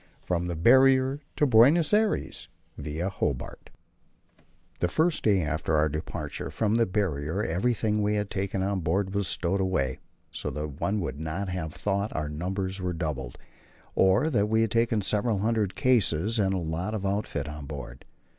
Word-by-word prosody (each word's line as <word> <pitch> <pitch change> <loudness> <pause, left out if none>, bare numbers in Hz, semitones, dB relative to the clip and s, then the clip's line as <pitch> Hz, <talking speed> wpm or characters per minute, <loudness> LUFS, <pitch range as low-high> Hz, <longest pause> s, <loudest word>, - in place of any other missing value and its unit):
From 90 -1 -1
the 85 - -3
Barrier 130 - +5 0.2
to 150 - +3
Buenos 140 - +5
Aires, 215 0 0 0.3
Via 80 +5 -4
Hobart. 70 -9 -3 1.1
The 90 - +2
first 160 - +1
day 100 -5 +3
after 75 +1 -1
our 75 +1 +3
departure 80 +2 -5
from 110 -2 0
the 115 0 +3
Barrier 90 -2 -1
everything 105 +4 0
we 105 +1 +1
had 105 -1 -2
taken 95 -1 -2
on 100 0 0
board 95 +3 -1
was 100 -2 0
stowed 95 +4 0
away, 70 -9 -1 0.3
so - - -4
that 75 -1 -6
one 100 +1 0
would 80 -4 -4
not 90 +5 -3
have 90 -4 -4
thought 100 +1 -1
our 75 -1 -2
numbers 95 +5 -3
were 90 -1 -2
doubled, 75 -7 -4 0.6
or 95 +12 +3
that 105 -5 +1
we 110 +1 +3
had 115 -3 +1
taken 115 -2 +1
several 105 +2 +1
hundred 105 -1 0
cases 110 -3 +2
and 95 -1 +2
a - - 0
lot 85 +5 -3
of 100 -2 -4
outfit 100 -4 -2
on 75 -2 -7
board. 70 -1 -8
95 Hz, 170 wpm, -27 LUFS, 80-110 Hz, 1.1 s, Barrier